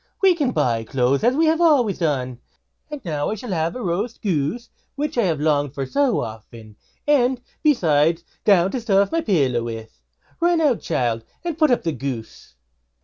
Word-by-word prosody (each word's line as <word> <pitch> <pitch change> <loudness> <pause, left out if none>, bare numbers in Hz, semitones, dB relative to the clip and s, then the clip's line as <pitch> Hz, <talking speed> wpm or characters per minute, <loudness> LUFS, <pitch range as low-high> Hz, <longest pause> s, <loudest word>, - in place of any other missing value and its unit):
We 385 -2 +5
can 295 -7 0
buy 115 - 0
clothes 130 +3 +1
now, 240 - +4
as 255 - -3
we 325 +3 +3
have 320 +1 +2
always 275 - +3
done; 130 -7 -1 0.5
and 295 -6 -8
now 150 -4 -2
I 215 - -2
shall 220 +1 -7
have 165 +1 -1
roast 215 0 -3
goose, 190 - -2 0.2
which 295 +2 -3
I 235 -4 +2
have 165 -5 0
longed 145 -3 0
for 135 - -2
so 270 - +1
often; 110 0 -9 0.3
and, 260 -3 +3 0.2
besides, 165 - +2 0.2
down 190 -3 +4
to 255 - -3
stuff 200 -3 +2
my 330 - +1
little 235 - -3
pillow 130 -6 +1
with. 115 - -8 0.4
Run 345 0 +2
out, 290 -7 +2
child, 120 -7 -1 0.2
and 340 -3 -3
put 310 -1 +3
up 245 - +2
the 165 - 0
goose." 125 - -7
180 Hz, 190 wpm, -22 LUFS, -, 0.5 s, We